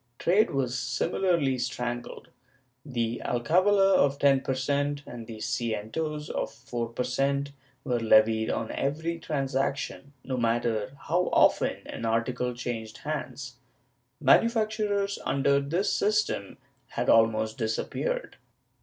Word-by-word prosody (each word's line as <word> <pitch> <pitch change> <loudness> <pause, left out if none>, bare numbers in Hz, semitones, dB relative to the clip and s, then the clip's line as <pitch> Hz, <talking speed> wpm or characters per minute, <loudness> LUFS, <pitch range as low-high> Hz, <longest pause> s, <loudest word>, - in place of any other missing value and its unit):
Trade 195 +5 +3
was 130 -2 -1
similarly 135 +2 0
strangled. 120 -1 -4 0.5
The 120 -4 -2
alcavala 185 +10 +3
of 140 0 +3
10 140 -2 +4
per 130 - -2
cent, 145 +2 -1
and 115 -2 -9
the 115 -2 -8
cientos 120 +8 -3
of - - -2
4 120 -1 -5
per 120 +2 -2
cent, 140 +3 0 0.3
were 125 -2 0
levied 110 0 +4
on 110 - -2
every 160 +4 -2
transaction, 140 -1 -2
no 130 -1 -3
matter 115 -1 0
how 180 +2 0
often - - +3
an - - -7
article 120 +2 0
changed 115 -3 -5
hands. 140 -4 -5 0.6
Manufactures, 210 - +2
under 140 +1 +2
this 165 +8 0
system, 210 - 0 0.3
had - - -3
almost 110 +1 +3
disappeared. - - -2
135 Hz, 120 wpm, -28 LUFS, 120-155 Hz, 0.6 s, 10